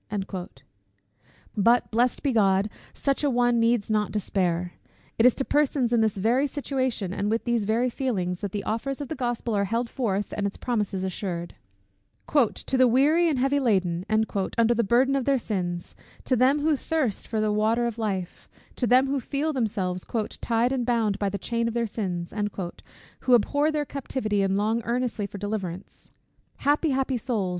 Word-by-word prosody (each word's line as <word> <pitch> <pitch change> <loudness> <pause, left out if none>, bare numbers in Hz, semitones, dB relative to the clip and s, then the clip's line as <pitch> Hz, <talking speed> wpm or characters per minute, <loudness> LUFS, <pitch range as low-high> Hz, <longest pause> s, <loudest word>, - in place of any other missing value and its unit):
But, 235 +4 +3
blessed 240 +2 +1
be 280 - +2
God, 200 -2 +3 0.2
such 275 +1 -1
an 280 -4 +1
one 245 -1 +3
needs 230 -2 +2
not 210 -2 +1
despair 180 -3 -1 0.5
it 230 - +7
is 250 - +4
to 270 - -2
persons 280 -4 +1
in 235 - +4
this 220 -2 +1
very 240 +8 +2
situation, 260 -9 -2
and 205 +1 -1
with 225 +1 0
these 235 -3 0
very 230 +4 +1
feelings, 190 -10 -2
that 200 -2 -3
the 205 0 -3
offers 255 +6 -2
of 285 - -5
the 315 - -3
Gospel 240 -3 -2
are 200 0 +2
held 230 +4 -2
forth, 205 -6 -2
and 200 -1 0
its 200 - -6
promises 210 -6 -2
assured; 180 -2 -4 0.8
"to 265 -1 +2
the 255 0 +6
weary 300 +8 +4
and 295 - 0
heavy 270 +3 +2
laden" 185 -9 +1
under 220 +1 +1
the 235 0 +1
burden 250 +6 +3
of 270 -3 0
their 275 -1 +3
sins; 180 -7 -3 0.3
to 255 - +1
them 260 +4 +3
who 310 0 +3
thirst 275 -7 -2
for 220 - -2
the 215 -1 +1
water 220 +3 +2
of 235 -1 -3
life; 190 -5 -3 0.3
to 245 - 0
them 255 +2 +5
who 275 0 0
feel 285 +5 -2
themselves 200 -8 -1 0.4
"tied 235 +1 +1
and 260 -2 0
bound 225 -4 +1
by 200 - 0
the 200 - -3
chain 235 +2 -1
of 230 - -3
their 235 -1 +1
sins;" 180 -6 -4 0.9
who 255 -1 +4
abhor 285 +7 +2
their 300 -1 -1
captivity, 255 -7 -2
and 195 0 +1
long 220 +3 +1
earnestly 235 -3 -1
for 205 - -9
deliverance. 195 -3 -5 0.5
Happy, 295 +3 +1
happy 265 -1 0
souls! 225 -6 -1
230 Hz, 180 wpm, -26 LUFS, 200-260 Hz, 0.9 s, it